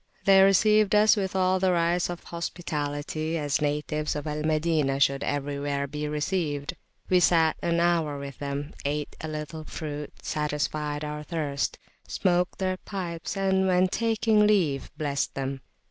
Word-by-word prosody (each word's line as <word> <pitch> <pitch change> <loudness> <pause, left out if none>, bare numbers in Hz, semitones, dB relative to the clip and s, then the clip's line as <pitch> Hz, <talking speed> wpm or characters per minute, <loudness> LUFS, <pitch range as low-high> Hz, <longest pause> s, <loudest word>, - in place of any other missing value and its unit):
They 195 -1 +7
received 210 +2 +5
us 210 +2 +6
with 190 -2 -2
all 185 0 +2
the 185 0 +3
rights 170 0 +1
of 175 -1 -6
hospitality, 155 -2 -3
as 145 -1 0
natives 150 +1 -1
of 150 - -4
Al 150 0 -3
Madinah 155 -3 +1
should 140 0 +2
everywhere 140 0 -2
be 150 +2 -4
received; 150 -1 -2 0.3
we 185 - +4
sat 165 -3 +4
an 170 0 +1
hour 170 -4 +1
with 140 -1 -8
them, 145 +1 -4
ate 145 +1 -2
a 160 - -4
little 155 +1 -5
fruit, 150 -2 -6
satisfied 150 0 -2
our 150 0 -4
thirst, 150 -3 -2 0.3
smoked 180 -1 +1
their 185 -1 -1
pipes, 180 -2 -5
and 190 -1 +2
when 185 0 +4
taking 220 -1 +2
leave 165 -10 +1
blessed 140 -2 -1
them. 135 0 -3
155 Hz, 150 wpm, -27 LUFS, 145-185 Hz, 0.3 s, They